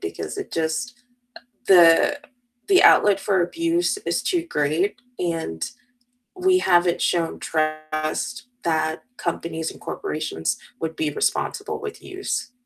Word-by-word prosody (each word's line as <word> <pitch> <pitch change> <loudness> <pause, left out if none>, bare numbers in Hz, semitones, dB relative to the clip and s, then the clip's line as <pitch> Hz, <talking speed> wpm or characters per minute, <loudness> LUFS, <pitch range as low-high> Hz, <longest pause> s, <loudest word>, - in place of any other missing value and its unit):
because 395 +1 -5
it 400 -2 -6
just 165 +10 -2
uh, - - -28 0.7
the 180 - +6 0.5
the 380 -2 +6
outlet 200 -2 +6
for 195 -3 +1
abuse 335 - 0
is - - 0
too 345 -2 0
great, 165 - 0 0.2
and 165 - -2 0.7
we 370 0 +3
haven't 175 - +3
shown 170 -2 0
trust 155 +10 -2 0.2
that 160 -1 0
companies 165 -1 -3
and - - -15
corporations 150 - -3 0.2
would 160 0 -3
be 155 -1 0
responsible 430 - -2
with 435 -2 -7
use. 370 -10 -4
175 Hz, 125 wpm, -23 LUFS, -, 0.7 s, the